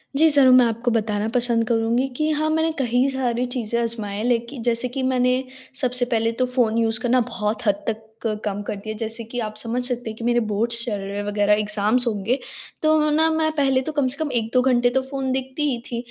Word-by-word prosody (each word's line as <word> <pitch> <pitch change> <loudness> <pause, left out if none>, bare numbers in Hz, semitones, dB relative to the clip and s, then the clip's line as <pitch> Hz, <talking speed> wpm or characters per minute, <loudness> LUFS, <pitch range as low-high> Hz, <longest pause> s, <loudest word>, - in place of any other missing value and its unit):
जी, 315 +3 +5
ज़रूर 275 -4 +5
मैं 255 -1 +6
आपको 230 +1 -1
बताना 215 -2 0
पसंद 235 -1 +2
करुँगी 235 +2 +1
कि 305 0 +1
हाँ, 310 +1 0
मैंने 320 +1 +1
कई 250 0 +2
सारी 250 -2 -1
चीज़ें 235 -2 -2
अज़माए 215 -3 -3
लेकि 240 +2 -1
जैसे 235 +1 +1
कि 260 +2 -4
मैंने 255 0 +1 0.4
सबसे 250 -1 +1
पहले 225 0 +1
तो 255 +2 0
फ़ोन 245 -3 +1
यूज़ 225 -1 +2
करना 250 0 +3
बहुत 220 -2 -3
हद 200 0 +1
तक 220 0 -2 0.2
क 215 -1 0
कम 205 -1 -2
कर - - -2
दिया। 215 +2 -6
जैसे 225 +1 -4
कि 235 +2 -6
आप 215 -2 -4
समझ 235 +3 -2
सकते 245 -2 -3
हैं 220 - -8
कि 230 - -8
मेरे 240 0 +3
बोर्ड्स 230 +3 +2
चल 210 -4 -2
रहे 195 +1 -6
हैं 205 - -2
वगैरह 205 0 +2
एग्ज़ाम्स 210 +3 +1
होंगे। 225 +4 0 0.4
तो 310 -1 +3
न 300 +1 +2
मैं 315 0 +1
पहले 270 -3 +2
तो 290 - -4
कम 290 -3 +1
से 260 +2 -4
कम 310 -2 -2
1-2 235 +1 +1
घंटे 245 -1 +3
तो 265 +2 +1
फ़ोन 265 0 -3
देखती 265 +3 -3
ही 245 - -1
थी 235 - -3
240 Hz, 225 wpm, -22 LUFS, 225-260 Hz, 0.4 s, मैं